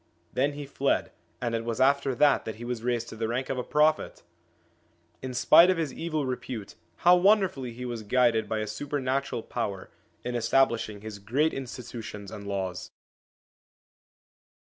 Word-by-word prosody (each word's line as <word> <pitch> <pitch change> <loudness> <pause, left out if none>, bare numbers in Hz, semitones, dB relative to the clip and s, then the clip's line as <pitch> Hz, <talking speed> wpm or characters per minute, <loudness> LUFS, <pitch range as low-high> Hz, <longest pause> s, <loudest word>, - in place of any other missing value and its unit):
Then 140 +3 +1
he 145 0 -6
fled, 140 0 0 0.3
and 120 -2 -2
it 115 0 -1
was 115 0 -3
after 135 0 +3
that 145 +2 +4
that 110 - -4
he 120 +2 -8
was 120 -2 -3
raised 120 -1 -1
to - - -8
the 110 0 -2
rank 125 +3 -2
of 130 - -1
a - - -2
Prophet! 150 +3 +1 1.0
In 130 - -4
spite 170 +8 +7
of 185 - +2
his 155 -5 -2
evil 155 -3 -2
repute, 125 -4 -5 0.3
how 175 +1 +9
wonderfully 180 - +3
he 125 +2 -7
was 120 -2 -4
guided 115 0 +2
by 110 -1 -1
a - - -1
supernatural 135 +2 -2
power 95 -2 -4 0.3
in 125 - -3
establishing 115 -3 +1
his 110 -1 -8
great 135 +10 +1
institutions 120 -6 -7
and 100 -1 -8
laws 95 -3 -3
125 Hz, 165 wpm, -28 LUFS, 110-140 Hz, 1.0 s, how